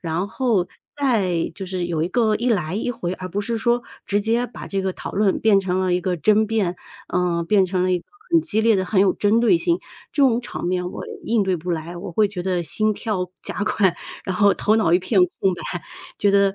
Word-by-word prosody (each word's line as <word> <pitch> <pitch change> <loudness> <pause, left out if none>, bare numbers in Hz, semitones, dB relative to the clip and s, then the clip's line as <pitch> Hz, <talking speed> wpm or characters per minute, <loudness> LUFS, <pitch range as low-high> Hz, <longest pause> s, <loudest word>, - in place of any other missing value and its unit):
然 170 +2 -2
后 205 -3 0 0.3
再 205 - +1
就 190 - -6
是 185 -1 -3
有 170 -3 -1
一 165 - 0
个 220 +2 +2
一 245 +2 -1
来 180 -6 0
一 225 +3 -1
回， 185 -7 -3
而 185 0 -7
不 200 +3 -2
是 230 +2 -2
说 240 +2 +1 0.2
直 205 +1 +1
接 230 +3 +1
把 240 - -10
这 195 - -2
个 190 0 -1
讨 - - -7
论 200 -1 +2
变 205 -3 +4
成 185 -1 -1
了 185 -1 +1
一 180 - +2
个 180 0 -1
争 215 +7 +3
辩， 205 -5 0 0.3
呃， 175 -1 0
变 200 +1 +4
成 185 0 0
了 185 - +1
一 180 - +2
个 - - -17 0.3
很 335 -1 +5
激 220 -5 0
烈 225 -1 +4
的、 190 - 0
很 190 +1 +2
有 190 -1 +4
针 210 +3 +2
对 240 +9 +5
性。 340 +1 +1 0.3
这 285 - +2
种 240 -3 +4
场 210 -6 -6
面 180 0 -1
我 - - -7 0.2
应 225 -2 +1
对 190 -2 0
不 175 +2 -5
来， 170 +1 -3
我 175 0 -7
会 210 +3 +3
觉 190 -3 -5
得 180 -2 0
心 215 +7 0
跳 200 -4 -3
加 - - -4
快， 190 -4 +2 0.3
然 185 -2 -2
后 200 0 +5
头 215 +1 +2
脑 175 -7 +2
一 175 - +6
片 195 +3 0 0.2
空 190 -2 +2
白， 175 -1 -5 0.4
觉 205 - +3
得， 200 -1 +3
195 Hz, 260 characters per minute, -22 LUFS, 180-220 Hz, 0.4 s, 一